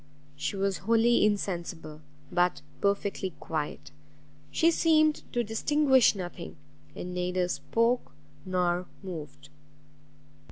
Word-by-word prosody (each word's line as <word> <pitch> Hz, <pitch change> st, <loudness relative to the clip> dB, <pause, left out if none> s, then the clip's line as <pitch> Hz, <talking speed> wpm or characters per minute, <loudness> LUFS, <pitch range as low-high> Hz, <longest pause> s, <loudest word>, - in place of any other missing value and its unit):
She 145 Hz, -, -3 dB
was 195 Hz, -1 st, 0 dB
wholly 230 Hz, +2 st, +3 dB
insensible, 175 Hz, -6 st, -2 dB, 0.3 s
but 180 Hz, 0 st, +1 dB, 0.2 s
perfectly 200 Hz, -2 st, -1 dB
quiet; 155 Hz, -2 st, -4 dB, 0.6 s
she 335 Hz, 0 st, +3 dB
seemed 310 Hz, -2 st, +3 dB
to 240 Hz, -, 0 dB
distinguish 265 Hz, +3 st, +3 dB
nothing, 175 Hz, -2 st, -7 dB, 0.4 s
and 180 Hz, 0 st, -6 dB
neither 180 Hz, 0 st, 0 dB
spoke 230 Hz, +6 st, 0 dB, 0.3 s
nor 180 Hz, -1 st, 0 dB, 0.2 s
moved. 150 Hz, -6 st, -8 dB
190 Hz, 95 wpm, -29 LUFS, 175-230 Hz, 0.6 s, wholly